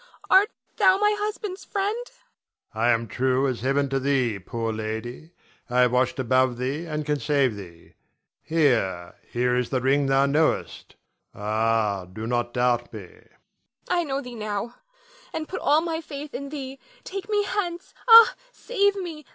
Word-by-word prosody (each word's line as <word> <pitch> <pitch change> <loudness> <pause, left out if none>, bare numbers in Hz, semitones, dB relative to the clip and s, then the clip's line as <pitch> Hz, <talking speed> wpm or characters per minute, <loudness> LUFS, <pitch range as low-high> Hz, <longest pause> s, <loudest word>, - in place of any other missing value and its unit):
Art 400 +3 +6 0.3
thou 380 -3 +5
my 420 +1 +3
husband's 415 -2 -4
friend? 405 +1 -1 0.8
Adrian. 110 +2 0
I - - +4
am 115 -1 +2
true 130 +4 +1
as 125 -4 -3
Heaven 140 +2 +1
to 135 0 0
thee, 130 -6 0
poor 115 +3 -4
lady. 110 +7 -5 0.4
I 125 +1 +3
have 125 -1 +4
watched 130 +5 +1
above 130 -1 +2
thee 140 +7 -3
and 150 -1 -3
can 150 0 0
save. 140 -6 +1 0.9
Here, 115 - +1 0.2
here 125 +1 +1
is 125 -1 0
the 130 - 0
ring 135 +2 +2
thou 135 +1 +3
knowest; 150 +3 0 0.4
ah, 105 -2 0
do 110 +4 -6
not 120 0 -1
doubt 120 -1 0
me. 110 - -7
Nina. 90 - -17 0.7
I 350 -1 +2
know 275 -3 -2
thee 250 -2 -9
now 215 +1 -4 0.6
and 310 -1 -3
put 375 - -5
all 300 +2 +4
my 330 -1 -3
faith 295 -1 -8
in 280 +1 -5
thee. 275 -2 -7 0.2
Take 390 +2 -6
me 415 -1 +2
hence. 370 -3 -3 0.2
Ah, 455 0 +10 0.2
save 405 -5 0
me! 340 -6 -6
140 Hz, 165 wpm, -25 LUFS, -, 0.9 s, Ah